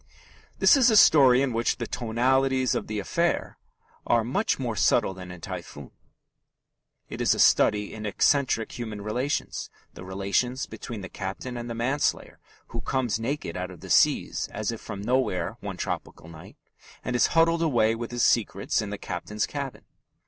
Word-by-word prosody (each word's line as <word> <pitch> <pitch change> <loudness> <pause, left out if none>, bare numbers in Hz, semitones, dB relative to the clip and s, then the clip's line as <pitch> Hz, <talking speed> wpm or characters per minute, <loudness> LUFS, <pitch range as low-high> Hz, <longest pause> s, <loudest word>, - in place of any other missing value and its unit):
This - - +6
is 255 -3 +5
a 220 - +4
story 135 -8 +7
in 130 -3 -1
which 115 +1 0
the 120 - -3
"tonalities 130 +2 +1
of - - -3
the 110 - -4
affair" 170 - -1 0.5
are 115 -1 +3
much 195 - 0
more 120 -4 -3
subtle 95 +1 +2
than 90 -1 -10
in 90 -1 -10
Typhoon. 70 -3 -8 1.2
It - - -6
is - - +3
a - - -6
study 105 -1 +3
in 110 -1 -5
eccentric 125 +1 +1
human 110 -3 -5
relations 125 +7 -2 0.2
the - - -10
relations 100 +7 -1
between 115 -4 -8
the 95 - -6
captain 100 +6 -6
and 120 0 -6
the 115 - -4
manslayer 130 +5 -1 0.3
who - - -5
comes 125 -5 -1
naked 120 - -3
out - - -4
of - - -12
the - - -7
seas - - +2
as 110 +2 -2
if 115 - -7
from 100 - -7
nowhere 120 -5 0
one - - -6
tropical - - -5
night, 80 -1 -13 0.5
and 125 - -2
is 120 - +4
huddled 165 0 +4
away 120 -9 +2
with 115 0 -5
his 120 0 -1
secrets 105 -2 +1
in 105 - -5
the 105 - -5
captain's 100 +3 -3
cabin. 140 -3 -6
115 Hz, 175 wpm, -26 LUFS, 105-130 Hz, 1.2 s, story